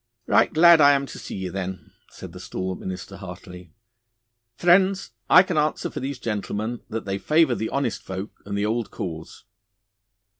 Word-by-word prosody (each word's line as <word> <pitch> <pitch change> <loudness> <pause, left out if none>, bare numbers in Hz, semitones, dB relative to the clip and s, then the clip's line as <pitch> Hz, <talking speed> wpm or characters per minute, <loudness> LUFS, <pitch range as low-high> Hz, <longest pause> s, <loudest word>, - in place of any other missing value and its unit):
'Right - - +3
glad 170 0 +7
I 145 0 +7
am 140 0 0
to - - -9
see - - -7
ye, 95 -1 -4
then,' 95 0 -6 0.2
said - - -11
the - - -10
stalwart 95 0 -5
minister 95 +1 -7
heartily. 90 -2 -10 0.8
'Friends, 185 +2 +3 0.2
I 180 - +8
can 175 -4 -1
answer 150 +1 -1
for - - -5
these 135 +1 -4
gentlemen 110 0 -3
that 115 +1 -4
they 100 0 -3
favour 155 -1 +3
the 110 -1 -3
honest 135 -4 -2
folk 95 +2 -7
and 100 0 -4
the 100 - 0
old 115 +1 -1
cause. 80 -3 -7
110 Hz, 175 wpm, -24 LUFS, 95-145 Hz, 0.8 s, I